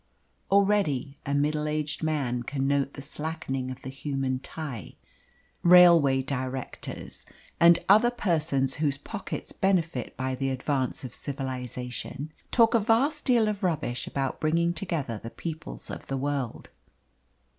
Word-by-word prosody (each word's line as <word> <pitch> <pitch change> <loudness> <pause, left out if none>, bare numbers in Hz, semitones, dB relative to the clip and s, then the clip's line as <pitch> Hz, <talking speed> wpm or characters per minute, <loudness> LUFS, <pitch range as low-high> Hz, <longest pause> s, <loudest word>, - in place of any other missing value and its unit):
Already 195 -9 +2
a 140 - +1
middle 150 +1 +1
aged 150 0 -2
man 140 -6 0
can 135 +2 -2
note 140 0 +1
the 140 - -8
slackening 150 -4 -4
of 130 0 -8
the 130 - -5
human 135 -1 -2
tie. 135 - -7 0.7
Railway 170 -7 +7
directors, 130 -1 -5 0.4
and 170 0 +8
other 215 +5 +6
persons 155 - 0
whose 145 -3 +1
pockets 195 +6 -6
benefit 170 -9 0
by 130 +1 -1
the 135 +1 -1
advance 130 0 -1
of 130 - -7
civilisation, 130 +1 -5 0.2
talk 230 -1 +4
a 230 - +5
vast 255 +8 +2
deal 235 -5 +4
of 210 -1 -2
rubbish 155 - -1
about 135 -1 -2
bringing 165 +2 +2
together 155 - -3
the 115 - -7
peoples 160 +5 -6
of - - -8
the 135 - -2
world. 140 -3 -3
145 Hz, 135 wpm, -27 LUFS, 130-170 Hz, 0.7 s, and